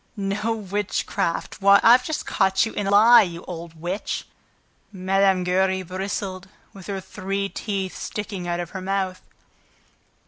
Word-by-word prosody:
"No 200 +3 -1
witchcraft! 200 -3 -2
Why, 200 +1 +7
I've 245 +2 +7
just 310 +4 -3
caught 190 +1 +2
you 225 - -6
in 205 - -2
a - - +1
lie, 225 +4 +8
you 170 -4 -4
old 165 -2 -8
witch!" 180 +5 -3 0.7
Mme. 190 -1 +2
Giry 190 +1 +1
bristled, 185 +1 -4 0.3
with 195 -2 -12
her 200 -1 -3
three 195 +1 -4
teeth 195 -4 -4
sticking 200 -4 -5
out 175 0 -1
of 175 -1 -5
her 190 - -6
mouth. 190 -1 -2
195 Hz, 145 wpm, -23 LUFS, 185-200 Hz, 0.7 s, lie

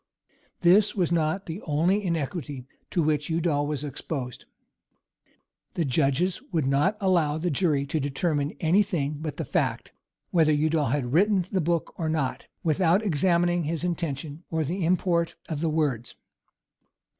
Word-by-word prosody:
This 195 +4 +5
was 180 -4 +1
not 170 +3 0
the 170 +5 -6
only 175 +7 +1
iniquity 150 -6 -3 0.2
to 170 - +1
which 150 0 0
Udal 160 -3 +1
was 150 -1 -3
exposed. 135 -3 -5 1.3
The 170 - 0
judges 145 - +1
would 160 -6 +1
not 145 +10 +2
allow 170 -7 +2
the 175 +2 -1
jury 145 -2 +1
to 155 +3 -2
determine 145 +1 -1
any 175 +5 +4
thing 155 -8 -1
but 155 -2 -5
the - - -3
fact, - - -1 0.4
whether 160 -3 +4
Udal 155 0 +1
had 125 -1 -1
written 190 +1 +3
the 190 - +1
book 170 0 -1
or 160 -2 -1
not, 155 -5 -2 0.2
without 175 +4 +3
examining 175 0 +2
his 165 +1 -2
intention, 160 -3 -3
or 160 -1 0
the 175 +6 -2
import 170 -1 +1
of 155 -2 -4
the 165 - +1
words. 140 -7 -1
160 Hz, 150 wpm, -26 LUFS, 145-175 Hz, 1.3 s, This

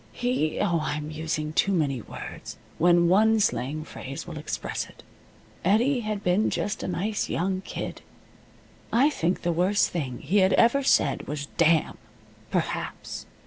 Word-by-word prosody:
He 245 -11 -1
oh, 170 -5 +2
I 150 -1 -2
am 150 0 -5
using 155 0 -3
too 195 - +2
many 145 -9 0
words, - - -8 0.2
when 175 0 +5
one 220 +5 +4
slang 155 -7 0
phrase 135 -3 -7
will 165 -3 -7
express 150 - -4
it. - - -17 0.6
Eddie 235 +8 +3
had 215 -3 -3
been 180 +5 +2
just 205 +1 -2
a - - -3
nice 195 +4 -2
young 185 +2 -1
kid. - - -6 0.9
I 270 +6 +4
think 175 - -1
the 175 - +1
worst 185 +5 +2
thing 135 -8 -3
he 180 +9 +1
had 190 -1 +4
ever 235 +4 +4
said 145 - +2
was 145 +1 -3
"Damn!" 165 -2 +3 0.5
perhaps. - - -3
175 Hz, 155 wpm, -26 LUFS, 155-210 Hz, 0.9 s, when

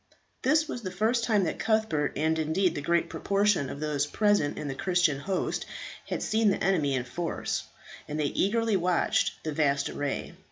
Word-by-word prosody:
This 305 +4 +3
was 245 - -5
the 190 - -4
first 220 +6 +1
time 210 -4 +3
that 165 - -2
Cuthbert, 220 -10 +1
and 160 +2 +1
indeed 165 +4 +1
the 145 - -4
great 170 +3 +1
proportion 200 -7 +1
of 140 - -6
those 150 -1 0
present 205 -5 +1
in 150 - -4
the 135 - -2
Christian 175 -1 +1
host, 190 +5 -2 0.4
had - - -3
seen 220 0 +2
the 195 - 0
enemy 155 -8 +2
in 125 - -1
force, 170 +7 -3 0.4
and 150 +1 -4
they 150 - +1
eagerly 220 +7 +1
watched 180 -1 +1
the 155 - -2
vast 140 -2 +1
array. 145 -1 -3
175 Hz, 185 wpm, -28 LUFS, 150-205 Hz, 0.4 s, This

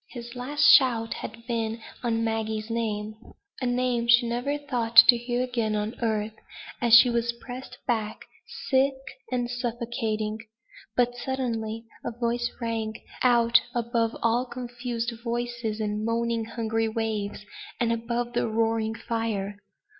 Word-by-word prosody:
His 240 0 -9
last 285 +4 -1
shout 235 -4 +6
had 225 +2 -8
been 230 -2 -2 0.2
on 230 -2 0
Maggie's 220 0 -2
name 215 -2 -2 0.5
a 255 - -1
name 245 -1 0
she 240 0 +6
never 245 +5 -1
thought 245 -5 -3
to 240 +2 +10
hear 240 +1 -1
again 235 -4 -1
on 210 +2 -2
earth, 220 -2 0 0.5
as 235 -2 +7
she 235 +2 +9
was 235 0 0
pressed 250 +2 -9
back, 220 -3 -2 0.5
sick 270 +1 +4 0.4
and 245 -1 0
suffocating. 235 -3 -2 0.6
But 245 0 +2
suddenly 230 -4 -3 0.2
a - - -2
voice 240 0 -1
rang 225 -2 -2 0.3
out 235 -2 +5
above 235 -1 0
all 235 +2 +2
confused 240 -1 -4
voices 235 -2 -2
and 210 0 -2
moaning 230 0 0
hungry 225 -1 -1
waves, 215 -2 -3 0.3
and 230 -1 +2
above 235 +1 -2
the 240 - +1
roaring 225 0 0
fire. 220 -3 -3
235 Hz, 135 wpm, -26 LUFS, 225-245 Hz, 0.6 s, to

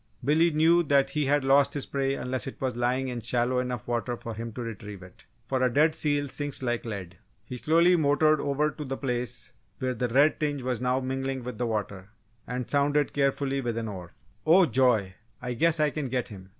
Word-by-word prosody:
Billy 160 +4 +4
knew 165 +2 +4
that 140 -3 +2
he 150 0 0
had 145 +1 +2
lost 140 +1 +4
his 145 - -3
prey 135 -1 -1
unless 130 0 -4
it 135 - -8
was 130 -2 -2
lying 125 +2 0
in 120 -1 -4
shallow 120 +2 0
enough 125 -3 -4
water 120 0 -2
for 115 - -7
him 115 +2 -6
to 125 - -6
retrieve 105 -4 -8
it: 90 -1 -16 0.2
for 130 -1 -1
a 130 -1 +2
dead 155 +5 +3
seal 145 -2 0
sinks 145 0 -3
like 120 -1 -1
lead. 95 -6 -7 0.3
He 125 - -7
slowly 170 +6 +4
motored 155 -1 +3
over 145 +2 0
to 150 - -7
the 135 -1 -4
place 125 -3 -4 0.2
where 130 -1 -2
the 125 +1 -1
red 140 +6 +3
tinge 145 -3 -2
was 125 -2 -2
now 125 +1 +1
mingling 135 0 -3
with 125 0 -7
the 120 - 0
water, 100 -3 -4 0.4
and 125 0 -4
sounded 145 0 +1
carefully 140 -1 0
with 120 -2 -3
an 115 -1 -3
oar. 90 -4 -8 0.3
"Oh, 175 +4 +6
joy! 120 - +2 0.3
I 125 0 -4
guess 165 +6 +2
I 150 -1 +3
can 145 -3 -4
get 125 0 -2
him!" 95 -3 -11
130 Hz, 215 wpm, -27 LUFS, 120-145 Hz, 0.4 s, Oh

